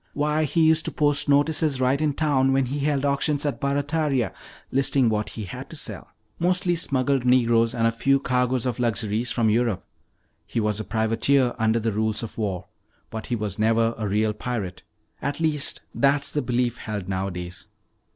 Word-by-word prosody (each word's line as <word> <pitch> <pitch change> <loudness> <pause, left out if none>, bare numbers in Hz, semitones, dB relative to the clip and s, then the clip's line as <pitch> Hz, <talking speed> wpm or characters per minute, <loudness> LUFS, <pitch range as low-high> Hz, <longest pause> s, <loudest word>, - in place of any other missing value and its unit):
Why, 150 +2 +1
he 160 +3 +2
used 160 0 +3
to - - -2
post 145 -1 +1
notices 145 0 +2
right 130 +3 +2
in 150 -2 +1
town 135 -3 +2
when 135 0 +2
he 140 +4 -3
held 145 -1 0
auctions 145 +1 0
at 145 - -2
Barataria, 145 -2 0 0.4
listing 135 -2 +2
what 105 -1 -1
he 110 - -7
had 95 - -8
to - - -8
sell, - - -4 0.3
mostly 180 0 +1
smuggled 140 -5 0
Negroes 120 -2 +3
and 115 -1 +1
a 115 - +4
few 135 +4 +2
cargoes 125 -1 0
of 125 -1 -2
luxuries 115 -1 0
from 115 -3 +1
Europe. 115 -3 0 0.6
He - - -2
was 105 -1 0
a - - -2
privateer 115 +4 +1
under 110 +1 +2
the 115 0 -1
rules 110 +2 -1
of 115 - -7
war, 95 -5 -2 0.5
but 110 -1 -6
he 120 - -1
was 105 -3 -4
never 115 +1 +2
a 110 -2 -3
real 105 +2 +1
pirate. 105 -5 -4 0.4
At 140 +3 -2
least, 155 -3 0
that's 140 0 +2
the 150 - 0
belief 120 -1 0
held 105 -4 -5
nowadays." 90 -2 -4
125 Hz, 180 wpm, -24 LUFS, 110-140 Hz, 0.6 s, a